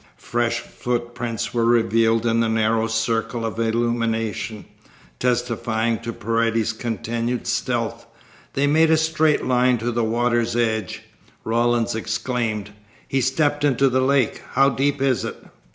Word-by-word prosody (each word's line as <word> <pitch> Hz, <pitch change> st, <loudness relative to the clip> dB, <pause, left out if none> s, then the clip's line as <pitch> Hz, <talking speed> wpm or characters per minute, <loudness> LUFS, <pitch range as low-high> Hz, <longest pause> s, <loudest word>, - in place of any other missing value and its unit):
Fresh -, -, -1 dB
footprints 120 Hz, -1 st, -4 dB
were 120 Hz, -1 st, +1 dB
revealed 115 Hz, -1 st, +3 dB
in 115 Hz, 0 st, +2 dB
the 115 Hz, -1 st, +2 dB
narrow 110 Hz, 0 st, +1 dB
circle 115 Hz, +1 st, -1 dB
of 110 Hz, 0 st, -4 dB
illumination. 115 Hz, -2 st, -1 dB, 0.5 s
Testifying 115 Hz, -2 st, 0 dB
to 115 Hz, 0 st, -5 dB
Paredes's 115 Hz, 0 st, 0 dB
continued 115 Hz, +1 st, -3 dB
stealth, 120 Hz, -1 st, -2 dB, 0.5 s
they 140 Hz, -, +1 dB
made 155 Hz, +3 st, +4 dB
a 160 Hz, -, +5 dB
straight 160 Hz, -1 st, +2 dB
line 125 Hz, 0 st, +3 dB
to 120 Hz, +2 st, -2 dB
the 120 Hz, 0 st, 0 dB
water's 120 Hz, +1 st, +1 dB
edge. 110 Hz, -2 st, -1 dB, 0.4 s
Rawlins 120 Hz, +1 st, +1 dB
exclaimed: 110 Hz, -1 st, -2 dB, 0.4 s
"He 135 Hz, -, 0 dB
stepped 145 Hz, +3 st, +1 dB
into 135 Hz, -1 st, +3 dB
the 130 Hz, +1 st, +1 dB
lake. 130 Hz, -3 st, +1 dB
How 135 Hz, +1 st, +5 dB
deep 135 Hz, +1 st, 0 dB
is 130 Hz, -3 st, +1 dB
it?" -, -, -4 dB
115 Hz, 135 wpm, -22 LUFS, 115-125 Hz, 0.5 s, a